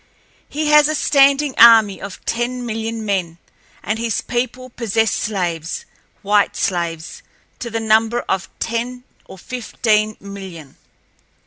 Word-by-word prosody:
He 300 +1 -2
has 300 -1 +6
a 310 - -1
standing 280 0 +3
army 225 -4 +7
of 195 - -9
ten 245 +1 -2
million 225 0 -4
men, 180 -5 -2 0.5
and 215 +1 -2
his 230 -2 -1
people 250 +1 -3
possess 225 -2 0
slaves—white 195 +2 -2
slaves—to 170 +6 -5
the 225 0 -2
number 225 +2 +2
of 190 -1 -2
ten 240 +2 -3 0.2
or - - -12
fifteen 215 -1 -1
million. 190 -7 -10
225 Hz, 115 wpm, -19 LUFS, 195-245 Hz, 0.5 s, army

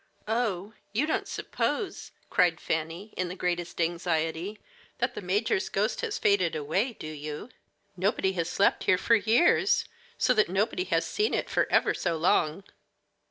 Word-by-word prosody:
"Oh, 215 -3 -1 0.2
you 240 +8 +2
don't 315 - -1
suppose," 420 -5 -2 0.2
cried 170 -2 +3
Fanny, 165 +6 -3
in 185 - -1
the 180 - -6
greatest 175 -2 -2
anxiety, 170 +2 -1 0.4
"that 245 +1 0
the - - -6
major's 205 - 0
ghost - - 0
has 460 -1 -2
faded 185 - +2
away, 175 - 0
do 195 - -10
you? 155 +6 -6 0.5
Nobody 190 +1 +1
has 170 -3 -2
slept 195 - +2
here 185 - +4
for 230 - +2
years, 240 - +4 0.3
so 255 - +3
that 215 -6 +3
nobody 210 - 0
has - - +1
seen 425 +1 0
it - - -2
for - - +1
ever - - +3
so 170 -2 -1
long." 160 +1 +2
190 Hz, 160 wpm, -28 LUFS, 170-225 Hz, 0.5 s, here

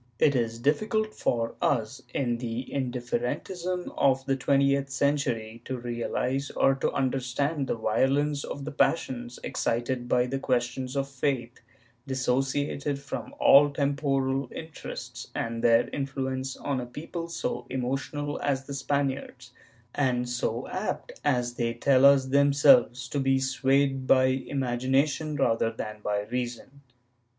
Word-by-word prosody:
It 145 -2 +4
is 115 -2 0
difficult 215 - 0
for 115 -1 -1
us, 130 -1 0
in 120 -3 -1
the 120 +1 -4
indifferentism 140 +8 -2
of 135 -1 +2
the 135 0 +1
twentieth 140 +1 +2
cen 140 +2 +2
tury, 115 -4 -3
to 130 - -3
realize 120 +3 -2
or 135 - +3
to 135 - -1
understand 135 +3 -1
the - - 0
violence 140 +6 +1
of 140 - -6
the 155 - -4
passions 125 -5 0
excited 120 +1 -1
by 125 - +3
questions 130 0 -1
of 135 0 0
faith, 135 -3 -2 0.5
dissociated 135 +2 0
from 140 0 -7
all 145 +1 +7
temporal 140 -2 0
interests, 160 -1 -7
and 115 0 -3
their 115 0 +5
influence 135 -1 -3
on 140 -2 -2
a 120 - -6
people 165 +6 -6
so 125 -7 -3
emotional 135 +3 -3
as 135 -1 0
the 140 - -6
Spaniards 135 -3 -2 0.4
and 125 -3 +1
so 120 0 -2
apt, 190 +3 -3
as 125 -4 +1
they 115 -1 -1
tell 130 +2 +4
us 140 -1 +7
themselves, 140 - +4
to 145 - -1
be 135 0 +3
swayed 135 0 +1
by 130 - +6
imagination 135 +3 0
rather 115 -5 +2
than 110 -1 -6
by 105 0 0
reason. 125 +4 -5
135 Hz, 135 wpm, -27 LUFS, 125-140 Hz, 0.5 s, all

